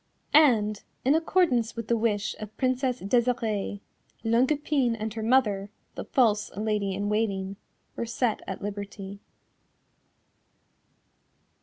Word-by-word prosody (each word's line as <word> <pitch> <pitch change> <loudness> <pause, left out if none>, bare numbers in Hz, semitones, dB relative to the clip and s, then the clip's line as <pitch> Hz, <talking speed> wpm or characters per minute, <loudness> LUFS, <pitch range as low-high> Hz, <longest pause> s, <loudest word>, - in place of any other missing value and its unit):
And, 220 -9 +5 0.2
in 270 - +5
accordance 320 -8 +2
with 230 -2 -5
the 235 - +2
wish 215 -2 0
of 215 0 -9
Princess 255 -1 0
Desirée, 220 -2 0 0.4
Longue 230 +3 +3
Epine 280 -5 +1
and 215 0 -3
her 220 - -4
mother, 215 -4 +2 0.2
the - - -6
false 220 -8 +2
Lady 210 -2 -1
in 200 +1 -2
Waiting, 200 -2 -1 0.4
were 235 - -3
set 230 -1 0
at - - -5
liberty. 200 -1 -6
220 Hz, 120 wpm, -27 LUFS, 205-250 Hz, 0.4 s, And